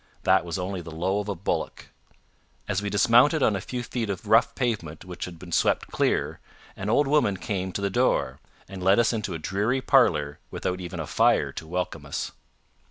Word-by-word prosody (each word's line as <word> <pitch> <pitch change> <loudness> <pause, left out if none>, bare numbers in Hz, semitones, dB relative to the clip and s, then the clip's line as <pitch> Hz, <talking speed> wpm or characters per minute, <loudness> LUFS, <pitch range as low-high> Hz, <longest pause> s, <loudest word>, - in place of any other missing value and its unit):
That - - +4
was 85 -2 -4
only 95 0 -3
the 85 - -9
low 90 +5 -1
of 105 0 -4
a 100 - -2
bullock. 95 - -3 0.8
As 100 -2 -1
we 105 - -2
dismounted 120 - +4
on 105 - +3
a 95 - -3
few 125 +4 -5
feet 115 -2 -3
of 100 +2 -4
rough 110 +3 +4
pavement 105 - -3
which 90 -1 -6
had 90 -2 -9
been 85 +1 -11
swept - - +1
clear, - - 0 0.4
an 100 +2 -4
old 145 +6 +3
woman 135 -9 +2
came 95 -1 -3
to 100 - -4
the 100 - 0
door, 125 +5 +1 0.3
and 95 -1 -8
led 95 +2 +4
us 120 0 +3
into 105 -5 -3
a - - -2
dreary 105 +10 0
parlour 85 - +3
without 90 0 -3
even 90 -1 -6
a 80 - -3
fire 80 +2 +2
to 80 - -8
welcome 90 +2 -4
us. - - -3
100 Hz, 205 wpm, -26 LUFS, 90-115 Hz, 0.8 s, That